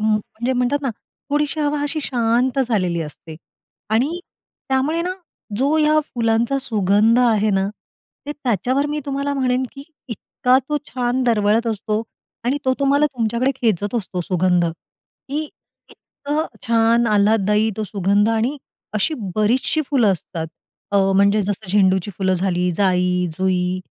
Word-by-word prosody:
म्हणजे 220 Hz, +3 st, -1 dB
म्हणतात 250 Hz, +3 st, +1 dB
ना 270 Hz, -, 0 dB, 0.4 s
थोडीशी 295 Hz, +1 st, 0 dB
हवा 295 Hz, 0 st, 0 dB
अशी 295 Hz, +2 st, -1 dB
शांत 245 Hz, +2 st, +1 dB
झालेली 180 Hz, -6 st, 0 dB
असते 155 Hz, +1 st, -10 dB, 0.6 s
आणि 285 Hz, +10 st, +1 dB, 0.5 s
त्यामुळे 285 Hz, +6 st, +1 dB
ना 365 Hz, +1 st, -2 dB, 0.4 s
जो 280 Hz, +5 st, +2 dB
या 305 Hz, 0 st, +4 dB, 0.2 s
फुलांचा 235 Hz, +3 st, +1 dB
सुगंध 215 Hz, +2 st, +3 dB
आहे 220 Hz, -4 st, +3 dB
ना, 195 Hz, 0 st, +1 dB, 0.6 s
ते 295 Hz, -, -3 dB
त्याच्यावर 260 Hz, +1 st, 0 dB
मी 300 Hz, +1 st, -2 dB
तुम्हाला 280 Hz, +1 st, -2 dB
म्हणेन, 255 Hz, -1 st, +1 dB
की 275 Hz, -, -10 dB, 0.3 s
इतका 250 Hz, +3 st, +1 dB
तो 300 Hz, -, 0 dB
छान 250 Hz, 0 st, -1 dB
दरवळत 220 Hz, 0 st, +2 dB
असतो 220 Hz, 0 st, -1 dB, 0.4 s
आणि 265 Hz, +4 st, +1 dB
तो 260 Hz, 0 st, +2 dB
तुम्हाला 285 Hz, +2 st, +3 dB
तुमच्याकडे 235 Hz, -1 st, 0 dB
खेचत 215 Hz, -4 st, 0 dB
असतो 185 Hz, -5 st, -2 dB
सुगंध, 180 Hz, 0 st, +1 dB
की 275 Hz, -, -8 dB, 0.5 s
इतकं 295 Hz, +3 st, -4 dB, 0.2 s
छान 230 Hz, +1 st, +3 dB
आल्हादायी 210 Hz, 0 st, +3 dB
तो 215 Hz, -, -2 dB
सुगंध 200 Hz, +1 st, +1 dB
आणि 230 Hz, +6 st, 0 dB, 0.4 s
अशी 215 Hz, +10 st, +1 dB, 0.2 s
बरीचशी 240 Hz, +8 st, +1 dB
फुलं 235 Hz, -8 st, +4 dB
असतात. 165 Hz, -2 st, -5 dB, 0.4 s
अ, 200 Hz, -, +1 dB, 0.2 s
म्हणजे 200 Hz, +1 st, +4 dB
जसं 200 Hz, 0 st, -4 dB
झेंडूची 190 Hz, -1 st, +2 dB
फुलं 190 Hz, -1 st, +1 dB
झाली, 180 Hz, -1 st, 0 dB
जाई, 180 Hz, -2 st, +2 dB
जुई 185 Hz, -1 st, 0 dB
225 Hz, 140 wpm, -20 LUFS, 200-265 Hz, 0.6 s, या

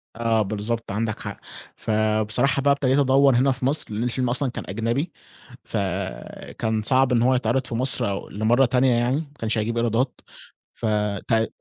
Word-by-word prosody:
آه 115 Hz, -1 st, +1 dB
بالضبط، 110 Hz, +2 st, -3 dB
عندك 110 Hz, +1 st, -2 dB
حق. -, -, -7 dB, 0.4 s
فبصراحة 110 Hz, +5 st, +1 dB
بقى 140 Hz, +1 st, +3 dB
ابتديت 140 Hz, 0 st, +2 dB
أدوّر 135 Hz, -1 st, +4 dB
هنا 135 Hz, +2 st, +3 dB
في 130 Hz, 0 st, -3 dB
مصر؛ 145 Hz, -3 st, 0 dB
لأن 110 Hz, +3 st, -2 dB
الفيلم 125 Hz, 0 st, -1 dB
أصلًا 130 Hz, 0 st, 0 dB
كان -, -, -6 dB
أجنبي 115 Hz, -, -1 dB, 0.5 s
فكان 100 Hz, -, -3 dB
صعب 130 Hz, +3 st, +3 dB
إن 120 Hz, -2 st, +3 dB
هو 130 Hz, +1 st, +3 dB
يتعرض 125 Hz, +1 st, 0 dB
في -, -, -4 dB
مصر 125 Hz, -4 st, 0 dB
أو 100 Hz, -, -5 dB
لمرّة 115 Hz, +5 st, +2 dB
تانية 125 Hz, +1 st, +2 dB
يعني، 120 Hz, +3 st, +1 dB
ما 150 Hz, -2 st, -7 dB
كانش 110 Hz, 0 st, -1 dB
هيجيب 115 Hz, +2 st, -1 dB
إيرادات 120 Hz, +3 st, 0 dB, 0.5 s
ف 115 Hz, -, -7 dB, 0.4 s
تي 115 Hz, -1 st, +2 dB
120 Hz, 170 wpm, -23 LUFS, 110-130 Hz, 0.5 s, أدوّر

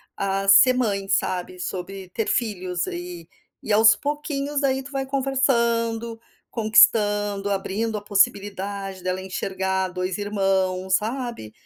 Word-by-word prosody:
ah, 195 Hz, 0 st, -2 dB
ser 200 Hz, +6 st, +7 dB
mãe, 200 Hz, -6 st, -1 dB
sabe, 180 Hz, -1 st, -1 dB
sobre 185 Hz, +1 st, -6 dB
ter 220 Hz, +3 st, -3 dB
filhos 185 Hz, -6 st, -2 dB
aí 175 Hz, -1 st, -7 dB, 0.4 s
E 215 Hz, -, -1 dB
aos 220 Hz, +1 st, +6 dB
pouquinhos, 290 Hz, -1 st, -3 dB
daí, 265 Hz, -1 st, 0 dB
tu 280 Hz, -, -11 dB
vai 270 Hz, -1 st, -2 dB
conversando, 235 Hz, -4 st, 0 dB, 0.3 s
conquistando, 205 Hz, -2 st, +3 dB
abrindo 210 Hz, +3 st, -2 dB
a -, -, -6 dB
possibilidade 200 Hz, -1 st, -1 dB
dela 185 Hz, 0 st, -2 dB
enxergar 190 Hz, 0 st, -2 dB
2 180 Hz, +1 st, -3 dB
irmãos, 190 Hz, -2 st, 0 dB
sabe? 230 Hz, -, -4 dB
205 Hz, 125 wpm, -23 LUFS, 190-235 Hz, 0.4 s, ser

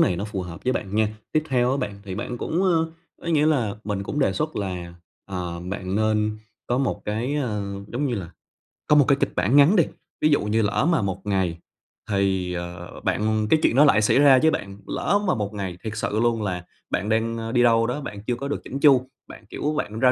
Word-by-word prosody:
này 90 Hz, -, +3 dB
nó 100 Hz, -, -3 dB
phù 105 Hz, -3 st, -4 dB
hợp 85 Hz, -1 st, -9 dB
với 130 Hz, -, +2 dB
bạn 100 Hz, -4 st, -4 dB
nha! 110 Hz, -1 st, +3 dB, 0.2 s
Tiếp 155 Hz, -, +2 dB
theo 125 Hz, -1 st, +2 dB
á 135 Hz, -, +1 dB
bạn 100 Hz, -7 st, -4 dB
thì 95 Hz, -2 st, -5 dB
bạn 120 Hz, +4 st, -4 dB
cũng, 170 Hz, +9 st, -1 dB
ơ, 165 Hz, -3 st, +2 dB, 0.3 s
ấy 170 Hz, -, -1 dB
nghĩa 150 Hz, 0 st, +4 dB
là 120 Hz, -10 st, +1 dB
mình 100 Hz, -2 st, -2 dB
cũng 145 Hz, -, -4 dB
đề 135 Hz, -, +2 dB
xuất 155 Hz, +1 st, -2 dB
là, 90 Hz, -3 st, -4 dB, 0.3 s
ờ, 90 Hz, -3 st, -4 dB
bạn 95 Hz, +1 st, -4 dB
nên 110 Hz, 0 st, +1 dB, 0.3 s
có 120 Hz, -, 0 dB
một 135 Hz, -, -1 dB
cái, 115 Hz, +7 st, -2 dB
ơ, 110 Hz, -8 st, -1 dB, 0.3 s
giống 135 Hz, +5 st, 0 dB
như 125 Hz, -, -1 dB
là, 90 Hz, -6 st, -5 dB, 0.6 s
có 150 Hz, -, +5 dB
một 145 Hz, -, +6 dB
cái 140 Hz, -, +5 dB
kịch -, -, 0 dB
bản 95 Hz, +9 st, +2 dB
ngắn 145 Hz, +7 st, +7 dB
đi, 170 Hz, -, +6 dB, 0.4 s
ví 155 Hz, -, +4 dB
dụ 145 Hz, -, +3 dB
như 105 Hz, +2 st, +1 dB
lỡ 110 Hz, +8 st, +1 dB
mà 165 Hz, -, +2 dB
một 100 Hz, -2 st, -3 dB
ngày 95 Hz, -4 st, 0 dB, 0.5 s
thì, 95 Hz, -2 st, 0 dB
ờ, 85 Hz, 0 st, -7 dB
bạn 110 Hz, 0 st, +1 dB
cái 160 Hz, -, +5 dB
chuyện -, -, +3 dB
đó 145 Hz, +3 st, +7 dB
lại 110 Hz, -6 st, +5 dB
xảy 110 Hz, +5 st, +3 dB
ra 140 Hz, -3 st, +7 dB
với 160 Hz, -, +4 dB
bạn, 100 Hz, -7 st, -4 dB
lỡ 205 Hz, -, +1 dB
mà -, -, +2 dB
một 105 Hz, -1 st, -3 dB
ngày 95 Hz, -4 st, -4 dB
thiệt 110 Hz, -, -4 dB
sự 110 Hz, 0 st, -1 dB
luôn 115 Hz, -1 st, +1 dB
là 90 Hz, -3 st, -3 dB, 0.2 s
bạn 100 Hz, +4 st, -1 dB
đang, 115 Hz, +1 st, +1 dB
a, 115 Hz, 0 st, -4 dB
đi 120 Hz, 0 st, +3 dB
đâu 115 Hz, -1 st, +4 dB
đó, 135 Hz, +5 st, -2 dB
bạn 105 Hz, -6 st, -7 dB
chưa 120 Hz, -, +1 dB
có 140 Hz, +3 st, -5 dB
được 145 Hz, -, -3 dB
chỉn 135 Hz, -, -5 dB
chu, 135 Hz, -3 st, +5 dB, 0.2 s
bạn, 110 Hz, -, -12 dB
kiểu, 150 Hz, +1 st, -2 dB
bạn 110 Hz, -7 st, -3 dB
ra 125 Hz, 0 st, +5 dB
110 Hz, 245 wpm, -24 LUFS, 100-135 Hz, 0.6 s, ngắn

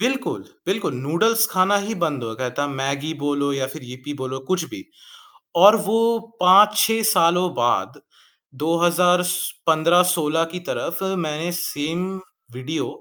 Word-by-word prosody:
बिल्कुल, 255 Hz, +3 st, -2 dB, 0.2 s
बिल्कुल। 190 Hz, -6 st, -1 dB
नूडल्स 190 Hz, -, +1 dB
खाना 190 Hz, +2 st, +3 dB
ही 220 Hz, +2 st, -4 dB
बंद 145 Hz, -6 st, -1 dB
हो 115 Hz, -1 st, -5 dB
गया 125 Hz, +2 st, -3 dB
था, 145 Hz, -, +1 dB
मैगी 140 Hz, +3 st, -3 dB
बोलो 145 Hz, 0 st, 0 dB
या 135 Hz, -1 st, -2 dB
फ़िर 150 Hz, +4 st, -9 dB
यिप्पी 130 Hz, +3 st, -9 dB
बोलो 130 Hz, -1 st, -5 dB
कुछ 180 Hz, -3 st, +1 dB
भी 305 Hz, -2 st, -9 dB, 0.8 s
और 210 Hz, +3 st, +9 dB
वो 215 Hz, +3 st, +1 dB, 0.4 s
5-6 210 Hz, +4 st, +5 dB
सालों 175 Hz, -2 st, +3 dB
बाद 120 Hz, -6 st, -1 dB, 0.6 s
2015-16 175 Hz, -1 st, +2 dB
की 180 Hz, -, -4 dB
तरफ़ 170 Hz, -, -3 dB, 0.2 s
मैंने 155 Hz, +3 st, -3 dB
सेम 170 Hz, +1 st, -3 dB, 0.5 s
वीडियो 130 Hz, +6 st, -4 dB
170 Hz, 130 wpm, -21 LUFS, 140-185 Hz, 0.8 s, और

